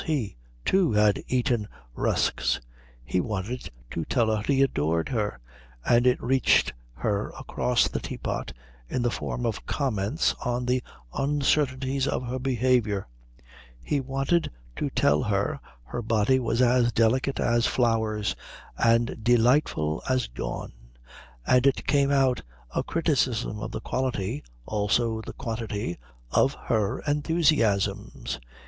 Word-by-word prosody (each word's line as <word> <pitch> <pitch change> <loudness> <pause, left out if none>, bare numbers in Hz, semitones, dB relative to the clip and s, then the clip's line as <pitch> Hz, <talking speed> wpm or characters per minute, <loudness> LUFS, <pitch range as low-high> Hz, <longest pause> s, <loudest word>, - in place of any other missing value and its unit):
He, 135 -11 -1 0.3
too, 190 - +3
had 105 -1 +3
eaten 120 -4 +1 0.3
rusks. - - +1 0.5
He 90 - +1
wanted 110 +4 -4 0.2
to 80 - -2
tell 110 - +1
her 105 - -2
he 135 +4 +3
adored 80 - 0
her, 105 -5 -1 0.5
and 120 +1 +4
it 125 - +3
reached 130 +1 +3 0.2
her 105 -1 -1
across 125 -2 +1
the - - -3
teapot - - -4 0.4
in 125 - -1
the 120 - +1
form 120 - -3
of 115 -3 -3
comments 125 0 0
on 125 0 -1
the 125 +1 +1 0.3
uncertainties 135 -1 +1
of - - -1
her 125 +2 -3
behaviour. 125 -6 +1 0.7
He 140 - -1
wanted 135 +5 0 0.3
to - - -1
tell 75 +1 +3
her 100 -1 0 0.2
her 120 - -5
body 110 +3 +2
was 115 0 +1
as 120 -1 +4
delicate 130 +4 +2
as 120 0 +2
flowers 110 -3 +1 0.4
and 115 -1 +2
delightful 120 - +3
as 130 -1 +1
dawn, - - -5 0.7
and 125 +1 +4
it 135 - +1
came 140 -2 +3
out 135 -3 +3 0.3
a - - +1
criticism 130 -10 0
of - - -4
the - - -5
quality 100 - -2 0.2
also 110 +2 0
the - - -8
quantity 110 - -4 0.3
of 135 +1 +3
her 110 -4 -1
enthusiasms. 115 - +1
120 Hz, 130 wpm, -26 LUFS, 105-130 Hz, 0.7 s, and